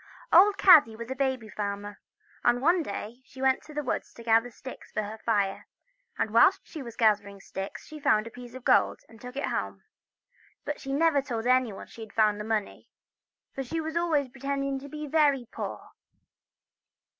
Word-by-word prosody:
OLD 395 +2 +7
Kaddy 315 - +7
was 235 +3 -7
a - - -2
baby 260 -4 -1
farmer, 205 0 -5 0.4
and 240 0 +3
one 340 +6 +3
day 230 -1 -6
she 260 0 -16
went 265 0 +2
to 305 - -14
the 295 0 -3
woods 255 - -3
to 230 - -11
gather 230 +1 +3
sticks 260 +2 -11
for 215 - -2
her 215 +2 -7
fire, 200 -4 -1 0.5
and 215 - -1
whilst 235 - +5
she 315 - -9
was 235 -3 -9
gathering 205 -3 +2
the 195 - -15
sticks 195 +1 -7
she 305 0 -10
found 215 -6 +2
a 230 - -8
piece 245 0 -11
of 260 - -9
gold, - - +3
and 225 -1 -17
took 250 +1 -9
it 280 - -1
home; - - -3 0.8
but 295 0 -4
she 270 - -5
never 295 0 +3
told 235 -4 -4
anyone 250 -5 +1
she 230 - -13
had 220 -2 -10
found 215 -2 +3
the - - -4
money, 215 -1 -3 0.6
for 270 - -4
she 325 +6 -3 0.2
always 325 -5 +1
pre 255 +2 -17
tended 275 -1 -2
to 285 - -10
be 300 +1 -6
very 285 -4 +2
poor. - - -6
250 Hz, 195 wpm, -28 LUFS, 220-280 Hz, 0.8 s, OLD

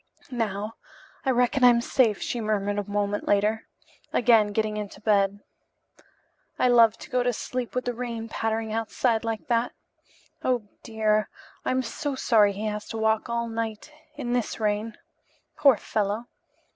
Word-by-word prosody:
"Now, 215 -2 -3 0.5
I - - +2
reckon 250 +1 +2
I'm 240 -1 +7
safe," 235 -3 +2
she 240 - -2
murmured 205 -1 0
a 205 0 -5
moment 205 0 -1
later, 210 +2 +1 0.4
again 230 -3 +5
getting 215 0 0
into 210 -1 -6
bed. 205 -1 +2 1.2
"I 250 - +3
love 230 -2 +6
to - - -11
go 250 - +2
to 245 0 +2
sleep 250 +1 -4
with 250 - -1
the 245 - -1
rain 230 -2 -4
pattering 225 0 -2
outside 225 +1 0
like 225 -2 -3
that. 235 0 +1 0.7
Oh, 250 -5 +1 0.2
dear, 215 -2 +1 0.3
I'm 260 0 0
so 280 +4 -3
sorry 215 -6 +4
he 205 +3 -5
has 210 0 -3
to 225 - -5
walk 220 +1 +1
all 235 0 -1
night 225 +3 -4 0.2
In 245 -4 -3
this 245 -2 -1
rain. 215 +1 -1 0.6
Poor 275 -6 +5
fellow! 210 +3 -2
225 Hz, 155 wpm, -26 LUFS, 210-240 Hz, 1.2 s, I'm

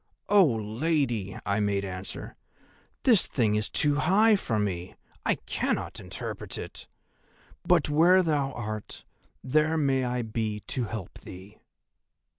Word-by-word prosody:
"'Oh, 200 -4 +6
Lady,' 110 - -1
I 100 +1 0
made 100 -1 0
answer, 95 0 -6 0.7
'this 230 -7 +5
thing 110 -5 +1
is 105 0 0
too 145 -1 +2
high 210 +8 +4
for 115 - -1
me, 95 -4 -3 0.3
I - - +3
cannot - - -3
interpret - - -6
it; - - -8 0.8
but - - +3
where 175 +5 +5
thou 145 -5 0
art, 110 -3 -6 0.4
there 155 +4 +2
may 135 -3 +2
I 125 -1 -1
be 110 -1 -3
to 125 - -1
help 105 -4 -7
thee. 95 +4 -12
120 Hz, 130 wpm, -27 LUFS, 105-155 Hz, 0.8 s, Oh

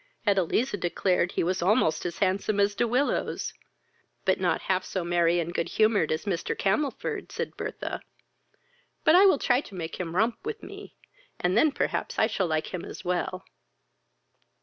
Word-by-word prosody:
Edeliza 205 +4 +1
declared 180 +1 +1
he - - 0
was 180 +2 0
almost 180 -4 +2
as 170 - -6
handsome 200 +2 +1
as 200 0 +3
De 235 - +1
Willows. 255 +5 0 0.7
"But - - +2
not - - +1
half 185 0 0
so 185 -1 -3
merry 170 0 +2
and 170 +1 -3
good 170 - -1
humoured 215 -7 +2
as 155 - -2
Mr. 180 -5 -2
Camelford, 220 +9 -1
(said - - -4
Bertha;) - - -5 1.0
but 315 - +5
I 380 +3 +8
will 375 - +5
try 250 0 +2
to 200 - -12
make 165 -2 -5
him 170 -2 -4
romp 225 +4 +1
with 445 +1 -5
me, - - -10 0.4
and 180 +1 +1
then 295 +7 +5
perhaps - - -2
I - - +4
shall 205 -4 -1
like 155 +2 -2
him 180 - -4
as - - -9
well." 180 +1 -2
190 Hz, 170 wpm, -27 LUFS, 175-220 Hz, 1.0 s, I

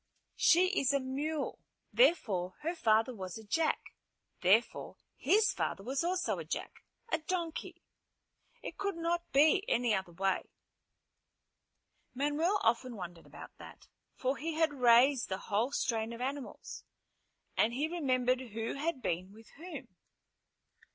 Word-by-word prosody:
"She 360 +2 +5
is 275 +1 +2
a 280 - +3
mule. 280 +3 -3 0.3
Therefore, 200 - +2
her 330 +3 -1
father 225 -5 +2
was 185 -4 -6
a 220 - -10
jack. 315 +10 -1 0.5
Therefore 200 +6 +2 0.2
his 425 +2 +3
father 195 - -2
was 265 +7 -1
also 360 +1 0
a - - -4
jack, - - -6 0.3
a 320 - +2
donkey. 335 0 -4 0.8
It - - -7
could 400 -1 -1
not 340 +1 -2
be 305 +8 +5
any 240 -2 +2
other 190 -3 -2
way." 190 +2 -1 1.7
Manuel 295 +8 +1
often 235 +2 +1
wondered 175 -4 -8
about - - -12
that, - - -12 0.3
for 265 +1 -1
he 325 +1 -3
had 320 -2 +2
raised 250 0 +5
the 190 - -1
whole 215 +6 -1
strain 230 -4 -1
of 230 - -8
animals, 270 +1 -5 0.7
and 225 - +3
he 280 +6 -1
remembered 255 -6 +1
who 225 -2 -4
had 295 -1 -3
been 180 +3 -2
with 220 +2 -16
whom. 350 +4 -8
260 Hz, 135 wpm, -32 LUFS, 225-320 Hz, 1.7 s, She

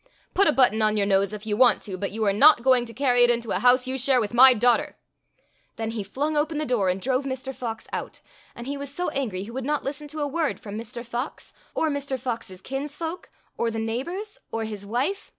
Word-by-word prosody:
Put 400 - +4
a - - +5
button 245 -6 +3
on 215 0 +3
your 200 - +2
nose 195 0 +2
if 210 0 -7
you 210 -1 -1
want 250 +2 +5
to, 195 -4 -5
but 195 +2 -3
you 220 +1 -2
are 200 - +3
not 270 +3 +6
going 255 -2 +4
to 230 - -9
carry 250 -2 +2
it 240 - +5
into 235 -1 0
a - - 0
house 250 +1 +4
you 260 +1 -2
share 260 0 +3
with 215 -1 -2
my 260 +2 +9
daughter." 240 +2 +2 0.8
Then 225 0 -3
he 225 -2 -3
flung 285 +10 -2
open 300 +1 0
the 305 - -1
door 230 -8 +1
and 185 +1 0
drove 255 +5 0
Mr. 265 0 -4
Fox 230 -3 -5
out, - - -5 0.4
and 240 - -8
he 280 +2 -4
was 280 -1 -5
so 355 +5 -2
angry 215 -9 -3
he 215 - -9
would 260 +2 -4
not 295 +2 -1
listen 295 +2 -5
to 305 +1 -6
a 290 - 0
word 310 +1 -1
from 205 -1 -8
Mr. 235 +2 -7
Fox, 240 +4 -5 0.2
or 315 - +1
Mr. 280 -2 -3
Fox's 225 -7 -5
kinsfolk, 295 - -5 0.3
or 235 - +1
the 225 - -4
neighbors, 305 - -4
or 225 - -2
his 210 -2 -6
wife. 275 - -2
250 Hz, 240 wpm, -25 LUFS, 220-280 Hz, 0.8 s, my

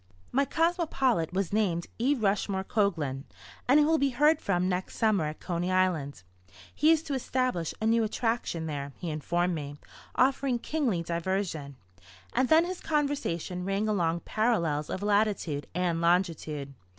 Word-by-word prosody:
My 275 +2 +2
cosmopolite 310 - +1
was 190 0 -2
named 180 -6 +1
E. 270 +5 +3
Rushmore 200 -4 0
Coglan, 160 -11 -1 0.4
and 275 +4 +6
he 295 - +5
will 320 +1 +3
be 280 - +2
heard 295 +4 +3
from 180 -2 +1
next 185 0 -3
summer 215 -7 +2
at 150 +1 -5
Coney 175 0 -2
Island. 170 - 0 0.5
He 305 - +3
is 320 -1 +3
to 295 - -4
establish 255 - -1
a 220 - -2
new 230 +1 +3
"attraction" 225 -6 -1
there, 140 -2 -4
he 170 - -4
informed 175 +4 0
me, 145 -2 -5 0.4
offering 265 -1 +2
kingly 235 - -1
diversion. 170 -4 -2 0.6
And 255 - +2
then 320 +2 +6
his 370 0 -5
conversation 280 - -1
rang 195 +3 -1
along 170 -5 0
parallels 170 -10 0
of 190 - -4
latitude 205 -8 +1
and 175 -2 0
longitude. 165 -5 0
195 Hz, 150 wpm, -28 LUFS, 170-255 Hz, 0.6 s, and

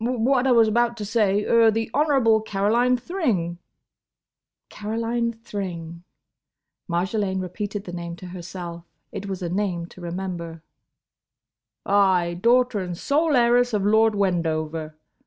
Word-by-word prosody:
"Hum!—what 250 +2 +1
I - - +4
was 230 -2 +5
about 235 +2 +1
to 210 - -4
say—er—the 220 +1 +2
Honourable 270 -7 +3
Caroline 220 +5 +1
Thring—!" 235 - -2 1.1
"Caroline 230 +2 -2
Thring"—Marjolaine 190 0 -5
repeated 200 +2 -4
the 175 - -8
name 170 -1 -5
to 180 - -11
herself. 175 -1 -7 0.3
It 200 - -6
was 190 -2 -4
a 175 - -2
name 180 -2 -1
to 185 - -14
remember. 170 -2 -5 1.2
"Ay—daughter 200 +5 +3
and 180 -2 -4
sole 300 - +1
heiress 245 0 +3
of 200 -2 0
Lord 220 +1 +4
Wendover. 160 -5 -1
205 Hz, 115 wpm, -24 LUFS, 175-235 Hz, 1.2 s, was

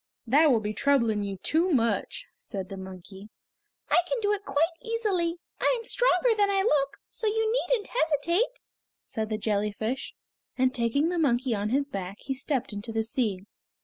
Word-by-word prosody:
"That 295 +6 +5
will 235 -5 +3
be 210 0 -3
troubling 235 -4 +2
you 200 -1 -4
too 330 +4 +2
much," 250 - 0
said 190 -2 -6
the 195 - -6
monkey. 190 +2 -10 0.6
"I - - +4
can - - 0
do 410 - +3
it 410 0 -3
quite 305 +5 +1
easily. 400 -7 0 0.2
I - - +3
am 460 - -9
stronger - - +3
than 410 -1 +3
I 390 -1 +2
look, 280 -9 +1
so 445 - -3
you 440 +1 +1 0.2
needn't 465 -5 0
hesitate," 340 - +1 0.4
said 220 -1 -4
the 215 - -1
jellyfish, 215 +4 -2 0.4
and 260 0 +2
taking 270 +5 +1
the 350 -1 -1
monkey 255 -4 +2
on 205 0 -1
his 280 +4 +1
back 195 -6 -5
he 270 - -3
stepped 265 -3 -2
into 205 +3 -5
the 225 0 0
sea. 220 -6 -1
275 Hz, 180 wpm, -27 LUFS, 215-360 Hz, 0.6 s, That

